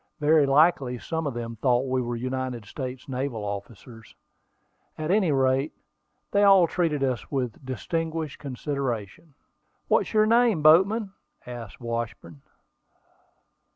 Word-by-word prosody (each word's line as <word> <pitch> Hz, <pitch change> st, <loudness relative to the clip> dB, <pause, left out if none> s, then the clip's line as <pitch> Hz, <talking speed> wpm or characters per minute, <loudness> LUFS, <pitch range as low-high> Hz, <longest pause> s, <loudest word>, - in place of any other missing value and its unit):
Very 150 Hz, -1 st, +4 dB
likely 135 Hz, -3 st, +3 dB
some 160 Hz, +5 st, -3 dB
of 135 Hz, -, -4 dB
them 115 Hz, -1 st, -5 dB
thought 125 Hz, +2 st, +2 dB
we 130 Hz, 0 st, 0 dB
were 120 Hz, -1 st, -3 dB
United 130 Hz, -1 st, -4 dB
States 130 Hz, 0 st, -7 dB
naval 130 Hz, -4 st, -3 dB
officers: 110 Hz, +3 st, -8 dB, 0.8 s
at 155 Hz, +2 st, -2 dB
any 195 Hz, -5 st, +3 dB
rate, 135 Hz, +2 st, +1 dB, 0.6 s
they 200 Hz, -, +3 dB
all 195 Hz, -3 st, +7 dB
treated 165 Hz, -4 st, -1 dB
us 125 Hz, -5 st, -2 dB
with 130 Hz, -2 st, -3 dB
"distinguished 160 Hz, +4 st, -3 dB
consideration." 135 Hz, -, -4 dB, 0.5 s
"What's -, -, +2 dB
your 215 Hz, -1 st, +4 dB
name, 230 Hz, -7 st, +3 dB
boatman?" 190 Hz, +7 st, +5 dB, 0.3 s
asked 120 Hz, -4 st, -8 dB
Washburn. 115 Hz, -, -5 dB
135 Hz, 120 wpm, -26 LUFS, 120-160 Hz, 0.8 s, all